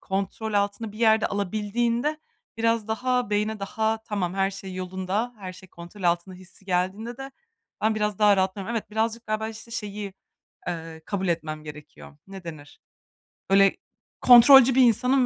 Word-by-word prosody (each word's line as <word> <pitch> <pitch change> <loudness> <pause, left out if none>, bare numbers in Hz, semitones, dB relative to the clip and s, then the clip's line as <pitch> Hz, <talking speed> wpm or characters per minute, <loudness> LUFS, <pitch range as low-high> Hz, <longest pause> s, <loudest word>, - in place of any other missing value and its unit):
kontrol 195 +3 -3
altına 205 +2 -1
bir 215 - -12
yerde 220 -1 +4
alabildiğinde, 230 +8 -1 0.4
biraz 230 -1 +1
daha 250 0 0
beyne 210 +1 0
daha, 220 +2 -1
"Tamam, 190 -4 -2
her 195 0 +1
şey 195 -1 -8
yolunda. 190 +6 -3
Her 185 -2 -7
şey 185 0 -15
kontrol 170 +4 -12
altında." 175 +1 0
hissi 185 +1 -15
geldiğinde 195 +6 -2
de 270 0 -8 0.5
ben 220 0 +2
biraz 210 -1 -1
daha 205 -2 +5
rahatlıyorum. 190 +3 -1
Evet, 220 - -5
birazcık 225 +2 -2
galiba, 215 +1 -2
işte, 225 +1 -11
şeyi, 205 -3 -5 0.5
ııı, 165 -2 -6
kabul 190 -2 -2
etmem 155 -2 -3
gerekiyor. 150 -1 -12
Ne 195 -2 -10
denir? 145 -3 -10 0.7
Böyle, 195 0 +5 0.4
kontrolcü 250 +1 +8
bir 265 - +6
insanım 250 +3 +3
205 Hz, 155 wpm, -25 LUFS, 185-225 Hz, 0.7 s, kontrolcü